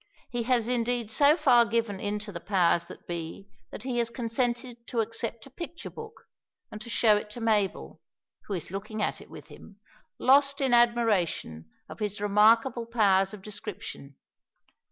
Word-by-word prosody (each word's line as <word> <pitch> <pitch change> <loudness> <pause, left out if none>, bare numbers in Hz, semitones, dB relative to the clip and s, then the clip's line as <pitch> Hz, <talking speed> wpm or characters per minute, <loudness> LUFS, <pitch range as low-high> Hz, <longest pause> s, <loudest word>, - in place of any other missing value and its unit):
He 240 - -1
has 240 -3 +2
indeed 240 -2 -1
so 290 +6 +5
far 240 -7 +5
given 230 -4 -1
in 205 +1 -2
to 205 - -8
the 175 - -6
powers 170 -3 +2
that - - -12
be 170 +3 -6 0.2
that - - -9
he 250 -2 -2
has 235 -1 0
consented 240 +1 -3
to 235 - -2
accept 230 0 -3
a 275 - -15
picture 340 +4 -8
book, 450 -1 -11 0.5
and 215 - -8
to 235 - -9
show 220 -2 +4
it 210 - -6
to 210 - -8
Mabel, 215 -4 -1 0.5
who 200 - -2
is 170 -1 -6
looking 215 +2 -4
at - - -2
it - - -15
with - - -12
him, - - -14 0.4
lost 275 +1 +4
in 265 -3 +1
admiration 215 - +2 0.2
of - - -11
his 210 -1 -3
remarkable 225 +4 +3
powers 195 -5 +3
of 205 -3 -10
description. 145 -8 -8
225 Hz, 175 wpm, -28 LUFS, 205-240 Hz, 0.5 s, so